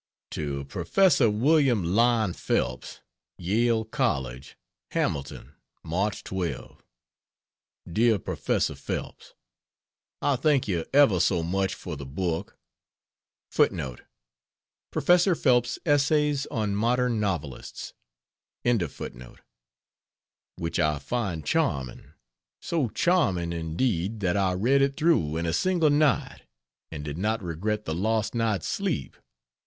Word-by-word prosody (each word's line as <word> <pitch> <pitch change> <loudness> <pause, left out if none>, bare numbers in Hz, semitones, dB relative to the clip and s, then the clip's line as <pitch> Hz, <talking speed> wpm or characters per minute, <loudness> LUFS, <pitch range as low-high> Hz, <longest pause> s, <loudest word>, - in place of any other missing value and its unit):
To 70 -3 -3
Prof. 140 - +2
William 125 - +3
Lyon 110 +2 +2
Phelps, - - -2 0.4
Yale 110 +5 +1
College: 70 - -2 0.4
HAMILTON, 70 -1 -2 0.3
March 95 +6 -2
12. 95 -3 -5 1.1
DEAR 110 +5 +3
PROFESSOR - - -1
PHELPS, - - -6 0.8
I 140 -2 +1
thank 140 -2 +2
you 85 -5 -1
ever 135 -10 +5
so 85 -1 +2
much 95 +3 -1
for 85 -4 -7
the 70 -2 -8
book 85 +5 -3 2.3
[Professor 180 +1 +3
Phelps's 120 -5 +2
Essays 145 -1 +2
on 105 -3 -2
Modern 120 +2 +1
Novelists.] 85 -11 -4 2.6
which 85 -1 -3
I 75 -1 +2
find 90 - -3
charming 65 -3 -1 0.5
so 155 -8 -1
charming 95 - +1
indeed, 85 +5 -1
that 90 -2 +1
I 95 -2 +2
read 125 +9 +2
it 140 0 +1
through 150 - +2
in 85 - -2
a 80 - -1
single 175 - +2
night, 145 -2 +1 0.5
and 75 -2 -6
did 75 +2 -5
not 110 +2 -1
regret 105 +6 -2
the 80 - -2
lost 110 +5 0
night's 115 -4 0
sleep. - - -2
105 Hz, 105 wpm, -26 LUFS, 85-130 Hz, 2.6 s, ever